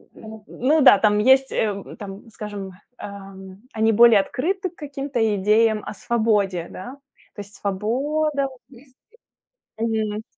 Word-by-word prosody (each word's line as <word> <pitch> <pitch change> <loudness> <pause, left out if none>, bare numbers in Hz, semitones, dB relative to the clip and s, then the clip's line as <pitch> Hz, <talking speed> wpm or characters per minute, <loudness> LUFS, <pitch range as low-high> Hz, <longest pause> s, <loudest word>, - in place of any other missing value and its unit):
н 220 -1 -11
ну 295 +6 +1
да, 260 -7 +8
там 210 -1 +3
есть, 265 +4 +4
э, 200 -3 -1 0.2
там, 200 +1 -9
скажем, 205 -3 -7 0.3
эм, 195 -1 -10
они 220 0 +2
более 230 -1 +6
открыты 370 - -3
к 345 - -27
каким-то 280 -4 -5 0.2
идеям 215 +2 +2
о - - -6
свободе, 205 -6 0
да. 245 +8 -9 0.4
То 205 - -6
есть 200 0 -13
свобода 275 +9 -1
вот 260 -2 -15
мысли. 260 0 -18 0.8
Мгм. 220 -1 -2
220 Hz, 140 wpm, -22 LUFS, 205-265 Hz, 0.8 s, да